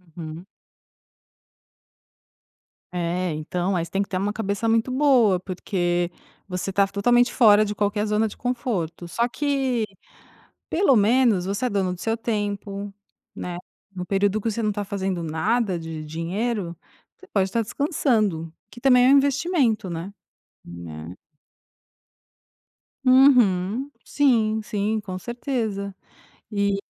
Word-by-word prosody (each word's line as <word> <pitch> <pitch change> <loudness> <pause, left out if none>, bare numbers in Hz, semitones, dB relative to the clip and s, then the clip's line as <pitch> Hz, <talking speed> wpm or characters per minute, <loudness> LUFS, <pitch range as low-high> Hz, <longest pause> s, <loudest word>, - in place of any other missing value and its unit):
Uhum. 165 +1 -7 2.5
É, 175 0 -1
então, 175 +5 -2
aí 170 - 0
você 165 - -15
tem 195 - 0
que 200 - -2
ter 185 - -1
uma 200 +2 0
cabeça 205 0 -2
muito 225 +2 +2
boa, 255 -8 +4
porque 175 -2 -1 0.4
você 180 0 -3
está 195 +1 +2
totalmente 240 +5 +2
fora 215 -4 +6
de 210 0 -4
qualquer 205 +1 0
zona 210 +1 +1
de - - -12
conforto. 225 - -3
Só 235 +7 0
que, 265 -3 0 0.8
pelo 330 -6 +3
menos, 215 -3 +3
você 200 +5 -2
é - - -2
dono 190 -3 0
do 180 - -10
seu 225 0 0
tempo, 205 -3 -3 0.4
né, 175 -1 -5 0.4
no 180 -1 -4
período 200 +2 +1
que 225 - -1
você 230 - -3
não 215 - +1
está 205 0 -3
fazendo 190 -3 -3
nada 185 +5 0
de 160 -1 -6
dinheiro, 175 +4 -3 0.4
você 380 - -16
pode 195 -2 +1
estar 230 +4 0
descansando, 215 - 0 0.2
que 240 - -13
também 250 -2 +5
é - - +6
um 280 - +7
investimento, 275 - +1
né. 170 +4 -5 0.5
Né. 85 -1 -9 1.9
Uhum. 250 -3 +4
Sim, 225 -6 +2
sim, 215 0 -1
com 190 -3 -6
certeza. 220 -3 -3 0.6
E 200 -2 0
205 Hz, 135 wpm, -24 LUFS, 180-235 Hz, 2.5 s, um